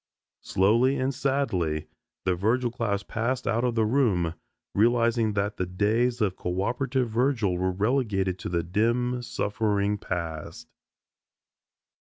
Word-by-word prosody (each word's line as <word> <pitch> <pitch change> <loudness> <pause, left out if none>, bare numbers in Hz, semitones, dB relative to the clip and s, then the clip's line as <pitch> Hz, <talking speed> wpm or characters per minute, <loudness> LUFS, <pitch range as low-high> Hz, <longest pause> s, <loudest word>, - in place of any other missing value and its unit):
Slowly 115 +8 +3
and 130 +1 0
sadly 120 - 0 0.4
the 95 - +2
Virgil 115 +7 +1
class 105 -4 -1
passed 120 +5 -2
out 115 +1 +1
of 125 -2 0
the 110 -1 +3
room; 105 -9 +2 0.4
realizing 115 0 +3
that 100 +1 -1
the 90 - -1
days 110 +6 +1
of 100 -4 +1
coöperative 125 +8 -1
Virgil 115 -4 +1
were 90 +1 0
relegated 100 -3 0
to - - -5
the 85 -1 0
dim, 120 +7 0
suffering 105 -3 -1
past. 80 -3 -5
110 Hz, 125 wpm, -26 LUFS, 95-125 Hz, 0.4 s, Slowly